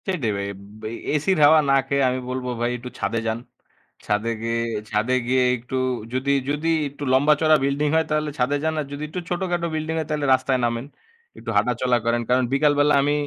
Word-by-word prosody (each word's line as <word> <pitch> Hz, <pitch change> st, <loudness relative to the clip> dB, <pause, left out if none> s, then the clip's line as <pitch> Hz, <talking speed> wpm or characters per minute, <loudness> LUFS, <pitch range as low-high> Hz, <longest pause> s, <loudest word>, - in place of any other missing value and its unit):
সেটাই 155 Hz, -, -1 dB
ভাই। 100 Hz, 0 st, -3 dB, 0.3 s
বে -, -, -5 dB, 0.3 s
এসির 175 Hz, +5 st, +1 dB
হাওয়া 155 Hz, +2 st, +7 dB
না -, -, +5 dB
খেয়ে, 140 Hz, 0 st, +1 dB
আমি 130 Hz, +1 st, -2 dB
বলবো 125 Hz, 0 st, -3 dB
ভাই 120 Hz, +1 st, +1 dB
একটু 125 Hz, +1 st, -8 dB
ছাদে 115 Hz, -, -1 dB
যান। 110 Hz, +1 st, -1 dB, 0.7 s
ছাদে 105 Hz, +3 st, 0 dB
গিয়ে, 115 Hz, 0 st, -1 dB, 0.3 s
ছাদে 110 Hz, +4 st, +1 dB
গিয়ে 130 Hz, 0 st, +3 dB
একটু 125 Hz, +3 st, -7 dB, 0.4 s
যদি, 130 Hz, +2 st, 0 dB, 0.2 s
যদি 150 Hz, +3 st, -1 dB, 0.2 s
একটু 145 Hz, +1 st, -9 dB
লম্বা 145 Hz, +3 st, +5 dB
চড়া 155 Hz, -1 st, +5 dB
বিল্ডিং 140 Hz, +2 st, +1 dB
হয়, 160 Hz, 0 st, +3 dB
তাহলে 155 Hz, 0 st, 0 dB
ছাদে 135 Hz, +4 st, +1 dB
যান। 160 Hz, 0 st, 0 dB
আর 150 Hz, -, -2 dB
যদি 145 Hz, +1 st, -5 dB
একটু 180 Hz, -, -4 dB
ছোটখাটো 175 Hz, -1 st, -1 dB
বিল্ডিং 155 Hz, +1 st, -2 dB
হয়, 155 Hz, -, -3 dB
তাহলে 150 Hz, -1 st, -1 dB
রাস্তায় 130 Hz, 0 st, +1 dB
নামেন। 120 Hz, +1 st, -2 dB, 0.5 s
একটু -, -, -8 dB
হাঁটাচলা 125 Hz, 0 st, +2 dB
করেন। 120 Hz, 0 st, +1 dB
কারণ 125 Hz, +1 st, +3 dB
বিকাল 145 Hz, +1 st, +3 dB
বেলা 145 Hz, +1 st, +4 dB
আমি, 145 Hz, +1 st, +1 dB
140 Hz, 200 wpm, -23 LUFS, 125-150 Hz, 0.7 s, হাওয়া